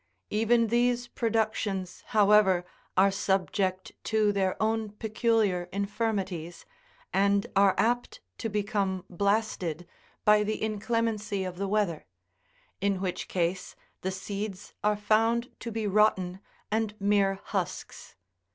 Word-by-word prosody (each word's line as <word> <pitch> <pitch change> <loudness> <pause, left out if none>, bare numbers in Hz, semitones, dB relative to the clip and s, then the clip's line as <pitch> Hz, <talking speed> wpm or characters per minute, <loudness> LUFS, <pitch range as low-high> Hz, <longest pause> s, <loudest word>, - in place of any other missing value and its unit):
Even 225 +2 +3
these 240 +1 +2
productions, 215 -5 -1
however, 205 -4 +4 0.3
are 195 +1 +6
subject 190 -1 0
to 215 -2 +2
their 190 -2 0
own 220 0 0
peculiar 215 -5 +1
infirmities, 200 -4 -2 0.5
and 200 +1 +3
are 195 0 +5
apt 240 +2 0 0.2
to 225 - -2
become 200 -3 -1
blasted 185 -4 -1 0.4
by 210 0 +6
the 215 +1 -1
inclemency 215 -2 -1
of 185 -1 -5
the 200 - -1
weather; 195 -6 0 0.7
in 200 -1 +1
which 185 -2 -3
case 180 +1 -2 0.3
the 190 - -1
seeds 195 +1 -5
are 210 0 +2
found 225 +3 +2
to 235 - -5
be 220 -1 -2
rotten, 190 -3 +2 0.3
and 220 -1 0
mere 200 -1 +3
husks. 190 - -4
205 Hz, 115 wpm, -28 LUFS, 190-220 Hz, 0.7 s, are